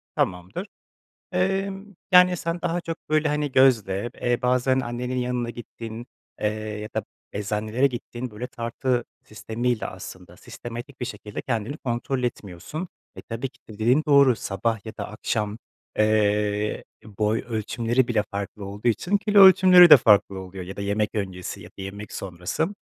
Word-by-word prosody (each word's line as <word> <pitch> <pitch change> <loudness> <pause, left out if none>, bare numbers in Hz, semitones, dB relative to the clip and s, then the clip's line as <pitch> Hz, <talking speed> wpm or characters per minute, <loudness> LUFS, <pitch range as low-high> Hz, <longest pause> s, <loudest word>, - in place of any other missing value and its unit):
Tamamdır, 105 - -2 0.7
emm, 195 +2 -1 0.3
yani, 180 0 +7
sen 170 +1 -3
daha 170 +1 0
çok, 165 -1 -5
böyle, 155 0 +2
hani, 150 -1 -1
gözle, 120 -5 +3
eee, 120 0 +1
bazen 125 +1 +2
annenin 125 +1 -3
yanına 125 -1 -1
gittiğin, 120 0 -8 0.3
eee, 105 - +2
ya 105 0 -5
da - - -1 0.3
eczanelere 105 +5 0
gittiğin 120 -1 -5
böyle 110 +4 -6
tartı 120 +1 -2 0.2
sistemiyle 110 +2 -2
aslında 90 -1 -10
sistematik 120 +7 -9
bir 125 - -2
şekilde 105 -1 -7
kendini 120 +2 -2
kontrol 125 0 -2
etmiyorsun. 120 - -5 0.3
E, - - -8
tabii 115 +3 -4
ki - - -28
de 110 - -9
dediğin 120 +8 +3
doğru, 140 -4 +6
sabah 105 +2 -2
ya 110 - -5
da 105 - -4
akşam, 105 0 -2 0.4
eee, 105 -1 +1 0.3
boy 105 +1 +2
ölçümleri 115 +2 0
bile 115 -3 +2
farklı 100 +1 -5
olduğu 100 +4 -2
için 175 - +1
kilo 205 0 +4
ölçümleri 185 -2 +9
de 150 - +13
farklı 100 -4 +4
oluyor 95 0 -8
ya 95 +2 -8
da - - -6
yemek 105 +1 0
öncesi 95 -4 -4
ya - - -11
da 95 - -11
yemek 100 +2 -7
sonrası. 90 - -3
115 Hz, 155 wpm, -24 LUFS, 105-135 Hz, 0.7 s, de